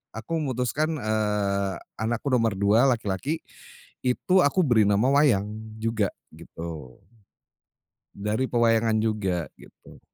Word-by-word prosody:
aku 120 +9 -6
memutuskan, 145 +4 -1
eee, 105 -3 0 0.3
anakku 120 +5 -1
nomor 115 -4 +2
2 110 +7 +4
laki-laki, 115 - -3 0.6
itu 180 +9 +2
aku 165 +6 +3
beri 120 -5 +4
nama 105 +5 +3
wayang 120 -9 +3 0.3
juga 110 -3 0 0.3
gitu. 80 -6 -9 1.2
Dari 105 +6 -1
pewayangan 115 -2 +2
juga, 95 -6 -1
gitu. - - -17
110 Hz, 105 wpm, -25 LUFS, 100-125 Hz, 1.2 s, 2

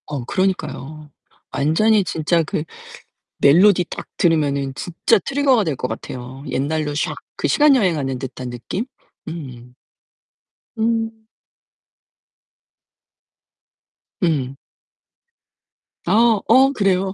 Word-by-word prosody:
어 145 -4 -4
그러니까요. 155 -5 -3 0.4
완전히 205 +9 +2
진짜 165 -1 0
그 150 - -3 0.8
멜로디 180 +6 +5
딱 - - -7
들으면은 145 -5 +1
진짜 175 +9 +1
트리거가 270 +1 +2
될 155 -6 -2
것 125 - -3
같아요. 130 +2 -7
옛날로 150 +2 -1
샥 145 - -2 0.2
그 - - 0
시간 295 -2 +5
여행하는 155 - 0
듯한 130 -1 -6
느낌? 150 - -5 0.4
음. 125 -7 -9 1.0
음. 225 0 -1 3.0
음. 140 -6 0 1.5
아 225 -1 +4
어 265 +4 +6
그래요? 195 -4 +1
165 Hz, 190 characters per minute, -20 LUFS, 140-215 Hz, 3.0 s, 어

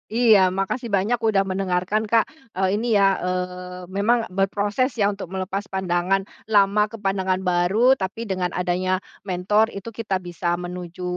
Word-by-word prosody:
Iya, 230 -4 +6 0.2
makasih 235 +5 -2
banyak 220 +5 +1
udah 215 -4 +2
mendengarkan, 190 +2 -1
Kak, 230 +6 +2 0.2
eee, 190 +2 +1
ini 230 -2 +1
ya, 195 -1 +4
eee, 180 0 -4
memang 225 +4 +2
berproses 205 +7 0
ya 205 -2 +2
untuk 195 -3 -7
melepas 190 +2 -4
pandangan 190 0 0 0.2
lama 205 -1 +4
ke 225 - -10
pandangan 190 -2 -1
baru 180 +8 +3
tapi 195 +5 -3
dengan 185 -4 -1
adanya 185 +1 0 0.2
mentor 200 +4 +2
itu 200 0 -8
kita 215 -3 -3
bisa 175 0 -2
menuju 180 0 -7
195 Hz, 150 wpm, -23 LUFS, 180-210 Hz, 0.2 s, Iya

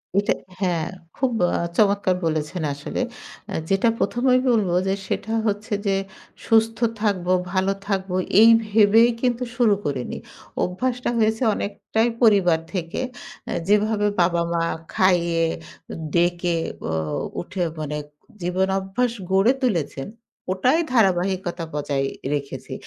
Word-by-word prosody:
ওইটা 200 +1 +3 0.3
হ্যাঁ 175 -4 0 0.3
খুব 255 -1 +1 0.2
আ - - +1 0.2
চমৎকার 200 -3 +3
বলেছেন 160 +2 -2
আসলে। 145 - -4 0.5
আ - - -4 0.2
যেটা 195 +4 +3
১ম 240 - -1
এই 255 - +5
বলব 215 -6 +2 0.2
যে 190 - +2
সেটা 220 - -3 0.2
হচ্ছে 205 +1 -2
যে 195 - +2 0.5
সুস্থ 225 0 +3 0.2
থাকবো, 185 -4 0 0.2
ভালো 190 +1 +1 0.2
থাকবো 190 -2 -1 0.3
এই 225 - +9 0.2
ভেবেই 220 +2 +5
কিন্তু 250 -1 0
শুরু 230 -4 +4
করে 140 -3 -1
নিই। - - -5 0.4
অভ্যাসটা 250 +8 -1
হয়েছে 220 +2 +2
অনেকটাই 220 +4 -1
পরিবার 195 -7 +5
থেকে। 170 -3 -3 0.5
এ - - -1
যেভাবে 210 0 +2
বাবা-মা 170 -1 +1 0.3
খাইয়ে, 170 -3 +3 0.7
ডেকে 175 0 +1 0.3
ও - - -1 0.5
উঠে 180 +1 -3 0.2
মানে 150 -1 -3 0.4
জীবন 180 +2 0
অভ্যাস 195 +6 -1 0.2
গড়ে 195 +5 +5
তুলেছেন, 165 - -1 0.4
ওটাই 250 - +2
ধারাবাহিকতা 185 -4 +1
বজাই 140 -2 -1 0.3
রেখেছি 140 -1 -5
190 Hz, 125 wpm, -23 LUFS, 175-220 Hz, 0.7 s, এই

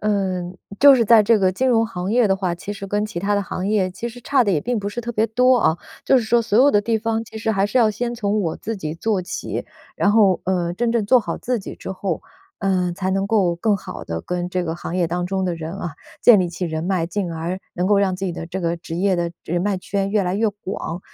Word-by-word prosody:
嗯， 185 -4 -1 0.2
就 285 0 +9
是 245 -3 +4
在 225 0 +7
这 220 +1 +4
个 190 -2 +2
金 260 +7 0
融 230 -2 +3
行 185 -3 -4
业 240 0 +4
的 195 - +3
话， 190 -2 -2
其 175 +4 -6
实 200 -1 -7
跟 205 +2 -1
其 210 -5 -5
它 200 +3 0
的 - - +1
行 185 - -4
业 205 -3 +2
其 185 +6 -5
实 240 +1 -11
差 265 +2 +2
得 205 - +1
也 160 -6 +1
并 245 +6 -2
不 200 - -3
是 205 +4 -4
特 240 0 -5
别 220 0 +2
多 250 +3 +4
啊， 170 -8 +2 0.3
就 265 - +5
是 235 - -2
说 235 +1 +3
所 220 -1 +1
有 270 +3 +7
的 205 - +4
地 225 +2 0
方 225 0 -1
其 220 - -9
实 220 0 0
还 195 -1 +1
是 210 +5 +1
要 230 -3 +5
先 240 +3 -3
从 215 -2 -1
我 165 -5 -2
自 225 0 -5
己 155 -5 -4
做 200 +2 -1
起。 180 - -4 0.3
然 200 - +2
后， 205 -4 +4
呃， 175 -2 0
真 235 +3 0
正 230 -3 0
做 250 +4 +5
好 215 - -4
自 245 -2 -2
己 - - -8
之 - - -6
后， 185 -3 -3 0.4
呃， 185 -3 0
才 190 +1 -2
能 195 0 0
够 195 -6 +2
更 205 +4 +1
好 190 - -8
地 80 0 -4
跟 180 - -3
这 180 0 -1
个 165 -1 -3
行 175 0 -5
业 180 -2 +2
当 175 +2 -2
中 190 0 -1
的 180 -2 -1
人 165 0 -6
啊， 175 -5 -5 0.3
建 225 -5 +7
立 180 - 0
起 175 +2 -4
人 160 -2 -3
脉， 180 -2 0
进 185 0 -3
而 170 +3 -4
能 180 +1 -1
够 205 0 +4
让 190 -2 +1
自 195 - -4
己 180 - -2
的 165 - -6
这 190 +2 -4
个 170 -1 -1
职 165 0 -7
业 190 +2 +2
的 170 -1 -1
人 175 +2 -1
脉 205 -1 0
圈 195 +1 -2
越 205 -2 +1
来 180 - -1
越 220 +2 +2
广， 195 -4 -5
195 Hz, 300 characters per minute, -21 LUFS, 180-220 Hz, 0.4 s, 就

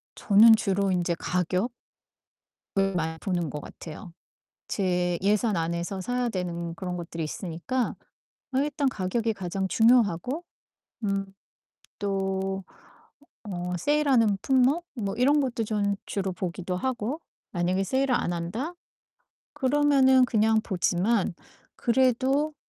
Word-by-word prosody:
저는 220 +2 +7
주로 200 -2 0
인제 175 -1 0
가격 180 +6 -1 1.1
을 195 -1 +2
많이 160 -1 -1
보는 175 -4 -1
것 150 - -5
같아요. 165 +5 -10 0.5
제 180 -3 0
예산 210 +1 +2
안에서 170 +3 -2
사야 245 +5 -1
되는 170 -3 -3
그런 180 +1 -4
것들이 170 -1 -5
있으니까 180 +10 -3 0.6
어 - - +3
일단 290 -1 0
가격이 225 +1 -1
가장 190 0 -3
중요하고 235 - +3 0.6
음 195 -1 0 0.7
또 195 -1 -2 0.9
어 180 -1 -3
세일하는 250 - +3
품목 270 +6 +3
뭐 200 -3 -3
이런 285 +5 +4
것도 240 -4 -1
좀 205 -2 0
주로 195 -2 -2
보기도 180 0 -4
하고 255 - -2 0.3
만약에 180 +1 0
세일을 260 +5 +1
안 175 - 0
한다? 210 - -3 0.8
그러면은 270 -2 +4
그냥 220 -2 +3
보지만 190 +1 +1 0.4
그래도 265 +4 +2
200 Hz, 240 characters per minute, -27 LUFS, 180-250 Hz, 1.1 s, 저는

